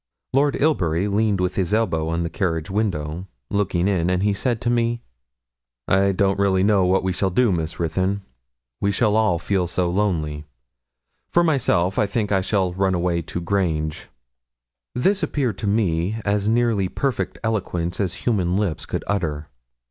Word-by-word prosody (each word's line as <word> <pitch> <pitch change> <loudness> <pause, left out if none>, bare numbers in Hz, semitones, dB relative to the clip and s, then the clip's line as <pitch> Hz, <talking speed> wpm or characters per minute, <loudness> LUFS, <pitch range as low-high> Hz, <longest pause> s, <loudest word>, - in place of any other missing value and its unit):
Lord 140 +1 +3
Ilbury 95 - +1
leaned 105 -1 +1
with 90 0 0
his 95 +2 0
elbow 80 -8 0
on 85 +1 -1
the 85 - -2
carriage 80 -2 -2
window, 90 -4 -2 0.2
looking 95 -3 +1
in, 90 -4 +1
and 90 +1 +1
he 105 0 +2
said 115 +3 -1
to 120 - 0
me 120 0 0 0.8
'I 95 - +3 0.4
really 95 -1 +3
don't - - +3
know 100 -3 +3
what 95 +1 +2
we 95 -1 0
shall 95 +2 0
do, 115 +4 +2
Miss 80 -2 -2
Ruthyn; 95 +4 -1 0.6
we 100 - +1
shall 105 +1 +2
all 110 -6 +3
feel 90 +1 0
so 90 0 0
lonely. 80 -7 -1 0.9
For 175 - +3
myself, 115 - +2
I 105 - +2
think 105 0 -2
I 95 -1 +3
shall 95 -2 0
run 95 0 +1
away 85 -1 0
to 85 +2 -5
Grange.' 80 -4 -1 0.9
This 190 +10 +2
appeared 135 - -1
to 105 - -2
me 100 -1 0
as 100 0 +1
nearly 115 -5 +2
perfect 135 +4 -2
eloquence 90 -6 -2
as 95 -4 -2
human 95 -6 +1
lips 100 -7 -2
could - - -3
utter. 75 -7 -2
95 Hz, 170 wpm, -22 LUFS, 85-110 Hz, 0.9 s, Lord